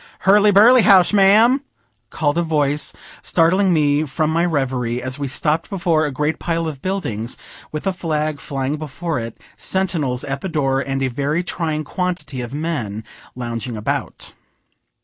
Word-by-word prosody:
"Hurly 205 +2 +5
burly 225 +5 +7
House, 195 -2 +5
ma'am!" 215 +7 +5 0.5
called 145 -2 0
a 170 - +2
voice, 150 -3 0 0.3
startling 185 +3 +2
me 150 -2 +2
from 155 +2 -1
my 165 +2 +2
reverie, 130 -7 -1
as 130 +2 -5
we 140 - -2
stopped 150 +4 -1
before 170 -5 +1
a - - -4
great 150 +4 -1
pile 165 -1 -1
of 145 -4 -6
buildings, 125 - -3 0.3
with 150 - -5
a 195 - +1
flag 155 -4 -2
flying 135 +1 -3
before 155 0 -4
it, 115 -1 -7 0.2
sentinels 165 -10 -1
at 140 -1 -4
the 190 - -4
door, 135 -4 0
and 135 0 -2
a - - +2
very 145 +6 -1
trying 160 -3 -2
quantity 150 -5 -3
of 120 -1 -6
men 140 -9 -3 0.3
lounging 120 -1 -4
about. 105 - -3
150 Hz, 160 wpm, -20 LUFS, 135-175 Hz, 0.5 s, burly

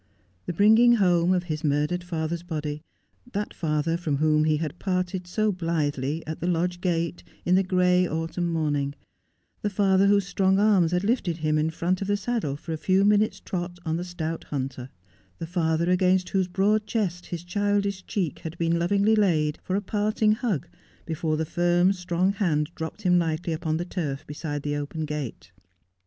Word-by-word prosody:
The 175 - -2
bring 210 +5 +5
ing 240 0 +7
home 180 -4 +3
of 180 -1 +2
his 155 -3 -4
murdered 150 +4 0
father's 165 -1 -3
body, 155 -3 -4 0.5
that 205 +1 -3
father 155 +1 0
from 155 -5 -1
whom 155 +1 +3
he 155 -1 +2
had 160 +2 -4
parted 185 -1 -2
so 215 +4 +1
blithely 155 -4 -2
at 160 0 -5
the 170 - -2
lodge 175 +1 0
gate 170 -2 -1 0.2
in 180 - +2
the 190 - +5
gray 180 -1 +3
autumn 165 +2 -2
morning; 145 -3 -1 0.7
the 210 - 0
father 195 -1 +3
whose 200 -1 +4
strong 190 -1 +2
arms 200 -5 +4
had 180 +1 +1
lifted 200 -7 0
him 155 -1 +1
in 155 +1 +1
front 175 +3 -1
of 195 - -2
the 205 0 +1
saddle 205 - -2
for 160 +3 -6
a - - -2
few 190 +5 +2
minutes' 205 -1 +3
trot 175 -1 -4
on 160 0 0
the 175 - -3
stout 165 -2 -4
hunter; 130 -2 -4 0.5
the - - -5
father 165 -1 0
against 185 0 +2
whose 190 -2 +1
broad 205 +4 +1
chest 190 -6 -2
his 170 -1 -5
childish 200 +1 0
cheek 185 - -2
had 165 +1 -7
been 170 0 +1
lovingly 200 +5 +3
laid 160 -8 +2
for 185 - -2
a 200 - +1
parting 215 +1 +1
hug 215 - -1 0.4
before 160 -1 -1
the 160 - -1
firm, 175 +3 +2
strong 180 +1 0
hand 165 -6 0
dropped 160 +6 -6
him 180 -1 +4
lightly 165 0 -1
upon 160 0 -1
the 175 - -3
turf 150 -7 -4
beside 145 -1 -5
the 145 0 -1
open 145 +2 -3
gate. 150 -5 -5
175 Hz, 185 wpm, -26 LUFS, 160-190 Hz, 0.7 s, ing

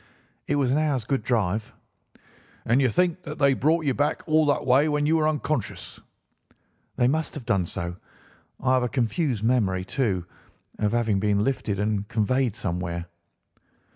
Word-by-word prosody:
"It 145 - +1
was 135 -3 +1
an 145 - +2
hour's 140 -7 0
good 135 0 0
drive." 110 -2 -1 0.9
"And 120 +4 +3
you 130 - +3
think 180 +6 +1
that 150 -3 -7
they 140 -2 +4
brought 160 +4 +1
you 135 - +2
back 145 +3 -1
all 155 -1 +3
that 145 - +1
way 135 +4 +4
when 150 0 +1
you 160 +2 +3
were 155 -1 +2
unconscious?" 150 -5 -3 0.9
"They 120 - +3
must 155 +3 -1
have 140 -6 -7
done 95 -5 +1
so. 85 +1 -4 0.6
I 130 0 +2
have 130 - +3
a 125 - -1
confused 125 - -1
memory, 100 -6 +1
too, 100 -8 -1 0.5
of 105 0 0
having 115 -4 +1
been 105 0 +1
lifted 110 -6 -1
and 105 -1 -1
conveyed 125 +1 0
somewhere." 85 -3 -3
125 Hz, 170 wpm, -25 LUFS, 105-145 Hz, 0.9 s, they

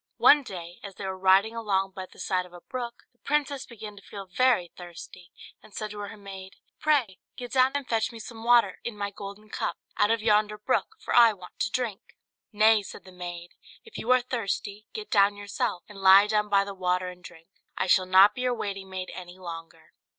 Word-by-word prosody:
One 295 - +7
day, 175 -8 -9
as 200 -2 -8
they 195 - -7
were 190 0 -3
riding 190 +4 +4
along 195 -4 0
by 190 -1 -7
the - - -20
side 180 -1 -1
of 180 - -21
a 175 - -10
brook, 240 +1 -6
the 245 - -42
princess 285 -2 -1
began 215 -3 -9
to - - -12
feel 200 0 -9
very 215 -2 +2
thirsty, 175 0 -11 0.3
and 210 - -17
said 215 -1 -4
to 210 - -8
her 205 +1 -7
maid, 195 -2 -10 0.2
"Pray 270 -11 +1 0.2
get 245 -1 -7
down 260 0 +4
and 285 -2 -2
fetch 225 0 0
me 230 - -10
some 225 0 -9
water, 240 0 +4
in 235 -3 -5
my 200 0 -3
golden 200 +1 -9
cup, - - -2 0.2
out 205 - +3
of 225 -1 +1
yonder 210 -1 +3
brook, 210 - -1
for - - -4
I 235 -2 +8
want 185 -3 -14
to - - +1
drink." 235 -6 -4 0.4
"Nay," 215 +1 +5
said 200 - -10
the 185 - -14
maid, 175 -1 -8 0.3
"if 450 - -16
you 230 - -6
are 255 0 +6
thirsty, 215 -4 -4
get 430 -1 -7
down 205 -1 +4
yourself, 200 -3 -3
and 205 -2 -12
lie 195 +1 +8
down 210 0 0
by 200 -1 +4
the 200 0 -7
water 180 -1 -1
and 180 0 -12
drink; 165 -2 -13 0.3
I - - +1
shall 185 0 +3
not 190 +3 +7
be 250 - -6
your 250 -1 +1
waiting 195 -3 -5
maid 185 -1 -5
any 180 0 -9
longer." 165 -3 -10
205 Hz, 220 wpm, -27 LUFS, 185-230 Hz, 0.4 s, I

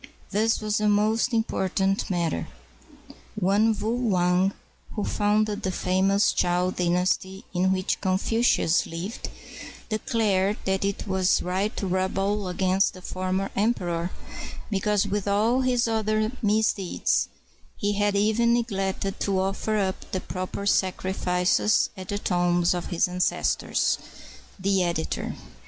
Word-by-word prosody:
This 220 +2 +2
was 215 0 0
a 210 - +2
most 215 +4 +2
important 195 -3 0
matter. 170 - -1 0.9
One 210 +3 +2
Wu 220 - -1 0.2
Wang, 180 0 +3 0.4
who 210 - -1
founded 210 0 +1
the 190 - -1
famous 190 +3 +2
Chow 180 +1 +1
Dynasty 180 +2 0
in 185 +1 +2
which 185 0 -1
Confucius 190 -1 +2
lived, 175 +7 -5 0.6
declared 210 -2 +1
that 190 0 0
it 200 +1 -2
was 190 -1 +2
right 190 +4 -1
to - - -2
rebel 195 +2 0
against 185 +2 +1
the 185 - -12
former 185 +1 -2
emperor 180 -6 0 0.6
because 205 0 +1
with 205 0 -2
all 220 +6 +2
his 250 -2 +2
other 215 0 0
misdeeds 210 -3 +1 0.5
he 205 0 0
had 205 0 +1
even 220 +3 +3
neglected 195 -4 -2
to 195 -2 0
offer 195 +3 -1
up 190 -2 -2
the 185 - +1
proper 185 +2 -5
sacrifices 185 0 +1
at 185 -2 -8
the 205 - -1
tombs 175 -2 +2
of 175 -1 -3
his 175 -1 +1
ancestors. 180 0 0 0.6
The 195 0 +2
Editor. 170 -2 -2
195 Hz, 125 wpm, -25 LUFS, 185-210 Hz, 0.9 s, Wang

